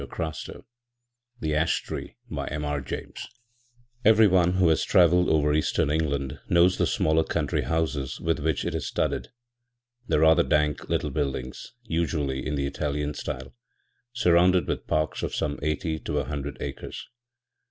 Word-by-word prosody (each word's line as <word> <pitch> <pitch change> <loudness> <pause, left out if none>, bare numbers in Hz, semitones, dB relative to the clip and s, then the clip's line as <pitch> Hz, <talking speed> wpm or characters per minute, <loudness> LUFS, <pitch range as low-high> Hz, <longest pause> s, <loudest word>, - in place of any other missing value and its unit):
The 75 - -1
Ash 80 +2 +1
Tree - - -6
by - - -4
MR 75 -2 -3
James 65 - -6 0.8
Everyone 95 -5 +5
who 95 -1 +3
has 80 - +2
travelled 90 -2 +4
over 75 -1 +3
Eastern 75 -1 +1
England 70 -3 -1
knows 90 +1 +4
the - - +3
smaller 80 +1 +2
country - - -1
houses 80 -5 -2
with 80 -1 0
which 80 0 -1
it - - -2
is 80 -6 -3
studded - - -1
â€" - - -23 0.8
the - - +2
rather 80 +2 +6
dank 75 -2 0
little - - 0
buildings, 65 - -4
usually 80 - -1
in 75 - -2
the 70 -1 -1
Italian 75 +1 -2
style, 65 -1 -6 0.6
surrounded 90 -5 +3
with - - -3
parks 75 -1 0
of - - -3
some 70 0 -2
eighty 80 +2 -1
to 75 -2 -3
a 70 - +1
hundred 70 0 -5
acres. 70 - -6
75 Hz, 150 wpm, -26 LUFS, 70-85 Hz, 0.8 s, rather